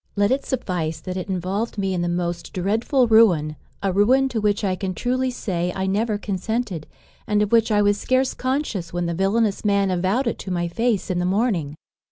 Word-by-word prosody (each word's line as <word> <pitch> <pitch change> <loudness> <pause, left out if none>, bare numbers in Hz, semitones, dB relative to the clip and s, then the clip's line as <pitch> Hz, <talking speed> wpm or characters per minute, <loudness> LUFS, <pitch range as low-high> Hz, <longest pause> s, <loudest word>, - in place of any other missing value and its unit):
Let 205 +1 +2
it 270 +2 +1
suffice 180 -11 -2
that 185 - -6
it 185 +1 -5
involved 190 +5 -2
me 195 -1 0
in 180 - -1
the 175 - 0
most 175 0 -3
dreadful 225 +8 +1
ruin; 180 -10 +4 0.3
a 195 -2 +1
ruin 255 +7 +4
to 230 -4 -2
which 210 0 +1
I 190 -2 +1
can 185 -1 -4
truly 255 +1 0
say 180 -8 -2
I 190 - -1
never 210 +3 0
consented, 200 -3 -3 0.4
and 210 0 +2
of 210 - -3
which 225 -1 +4
I 205 -1 +4
was 205 0 +2
scarce 255 0 +1
conscious 255 - -2
when 175 0 -2
the 170 - -1
villanous 195 +4 +1
man 200 -2 +2
avowed 190 +9 +1
it 235 - -2
to - - -7
my 175 -1 -1
face 220 +2 0
in 180 - 0
the 180 - 0
morning. 185 - 0
200 Hz, 210 wpm, -22 LUFS, 180-230 Hz, 0.4 s, ruin